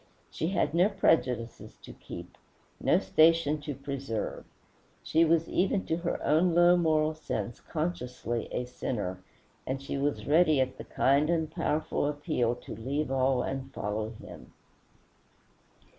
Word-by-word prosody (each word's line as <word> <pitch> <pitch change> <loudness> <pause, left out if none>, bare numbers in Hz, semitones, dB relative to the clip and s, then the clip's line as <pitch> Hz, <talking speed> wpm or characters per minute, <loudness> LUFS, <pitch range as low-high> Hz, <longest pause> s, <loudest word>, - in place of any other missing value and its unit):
She 160 - -2
had 180 -3 0
no 180 +4 +4
prejudices 130 - 0
to - - -10
keep, - - -10 0.4
no - - +3
station 155 -2 +3
to 145 -1 -5
preserve; 135 -5 -4 0.6
she 160 +1 +3
was 165 0 +3
even 190 +1 +1
to 160 - -1
her 175 0 -2
own 165 +3 +3
low 175 +1 +6
moral 155 -2 +2
sense 120 -8 -4
consciously 125 -8 -3
a 125 - -2
sinner, 100 -7 -4 0.5
and 130 +1 -2
she 140 0 -4
was 145 +1 -1
ready 155 -1 +4
at 130 0 -1
the - - -7
kind 140 +3 +2
and 160 -2 0
powerful 155 -3 -1
appeal 145 -5 0
to 120 - -9
leave 135 +6 -2
all 130 -1 +2
and 135 0 -4
follow 105 +2 -2
him. 110 - -12
145 Hz, 145 wpm, -29 LUFS, 125-165 Hz, 0.6 s, low